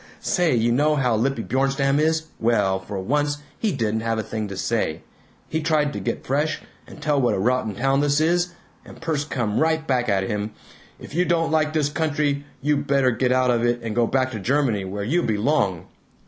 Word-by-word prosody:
Say, 175 -7 +1
you 115 0 +2
know 150 +5 +3
how 125 -5 +2
lippy 115 +1 0
Bjornstam 135 +2 +1
is? 160 +1 +2 0.2
Well 110 -5 +2
for 95 +1 -6
once 145 +8 0 0.2
he 220 - +1
didn't 110 - -1
have 115 0 -1
a 110 - -1
thing 110 -1 -4
to 100 -1 -7
say. - - -1 0.4
He 160 - -2
tried 150 -2 +1
to - - -4
get - - -3
fresh, 150 +4 0 0.3
and - - -12
tell 150 -2 +1
what 120 - +2
a - - -2
rotten 120 0 0
town 135 +2 +2
this 145 0 +2
is, 175 +2 +1 0.3
and - - -13
Perce 160 -3 -1
come 120 -8 -1
right 160 0 +1
back 125 -4 0
at 95 -1 +2
him, 105 +1 -3 0.5
'If - - -11
you 175 +3 +2
don't 165 -2 +1
like 155 -1 +2
this 150 -2 +1
country, 145 -2 0 0.2
you 150 0 +2
better 140 -2 +2
get 125 +1 0
out 130 0 +3
of 120 -1 +1
it 120 0 +1
and 110 -2 -3
go 120 -1 +3
back 130 +1 +1
to 110 - -5
Germany, 120 -3 +1
where 100 +2 -4
you 160 +12 +1
belong!' 105 - 0
135 Hz, 210 wpm, -23 LUFS, 115-150 Hz, 0.5 s, know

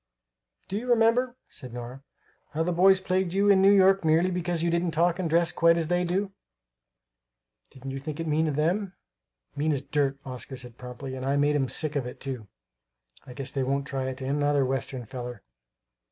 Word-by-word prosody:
"Do 195 - -3
you 250 +2 -7
remember," 240 +2 +3
said 125 - -9
Nora, 125 +2 -7 0.5
"how 160 +1 0
the 180 - 0
boys 190 +2 +5
plagued 185 -1 -1
you 200 +1 +3
in 190 -1 +5
New 195 - +6
York, 195 -1 +5
merely 165 +3 +3
because 175 -2 -2
you 170 - +1
didn't 170 0 0
talk 170 +2 +2
and 175 -3 -1
dress 170 +1 +3
quite 165 0 +4
as 165 -1 -1
they 175 0 +2
do? 190 +3 -1 1.4
Didn't 135 +1 -8
you 135 - -4
think 145 +2 -6
it 165 - -2
mean 155 +1 +1
of 150 - -1
them?" 180 +6 0 0.6
"Mean 150 +2 0
as 140 -1 -2
dirt," 140 -1 0
Oscar 130 0 -7
said 125 -1 -10
promptly; 125 +2 -7
"and 130 0 -5
I 135 +2 +1
made 145 +1 +2
'em 135 -3 +1
sick 155 -1 -1
of 135 -4 -1
it, 125 - -9
too. 130 -6 -5 0.8
I 125 - -9
guess 135 +1 -6
they 140 - -2
won't 140 +2 0
try 135 -3 -3
it 130 0 -5
on 130 - -3
another 145 -1 +2
Western 130 -1 -3
feller!" 120 -1 -7
150 Hz, 205 wpm, -27 LUFS, 135-180 Hz, 1.4 s, New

